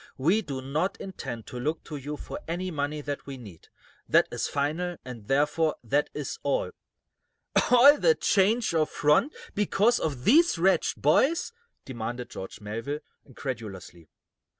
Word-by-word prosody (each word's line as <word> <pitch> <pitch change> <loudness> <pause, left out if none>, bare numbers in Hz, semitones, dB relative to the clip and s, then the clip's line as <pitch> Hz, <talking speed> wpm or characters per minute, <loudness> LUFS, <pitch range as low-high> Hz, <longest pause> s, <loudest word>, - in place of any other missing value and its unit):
"We 170 +11 +2
do 135 -8 -6
not 155 +8 -1
intend 120 - -6
to 125 - -7
look 155 +6 -2
to 155 - -8
you 145 +1 -5
for - - -7
any 180 +3 -3
money 150 0 -2
that 145 -1 -5
we 135 -1 -6
need. 100 -10 -13 0.4
That - - +5
is - - -2
final, 160 +5 -2
and, 115 -5 -9
therefore, 150 +3 +2
that 145 +5 +1
is 150 -2 -4
all." - - 0 1.0
"All 270 +4 +7
this 480 -1 +4
change 215 +2 +2
of 155 -2 +2
front 150 - +3 0.2
because 210 +3 +2
of 140 -6 -3
these 325 - +5
wretched 190 +3 +2
boys?" 290 - +3 0.3
demanded 120 -1 -5
George 95 - -8
Melville, 115 +8 -4 0.2
incredulously. 110 - -7
150 Hz, 150 wpm, -27 LUFS, 130-185 Hz, 1.0 s, All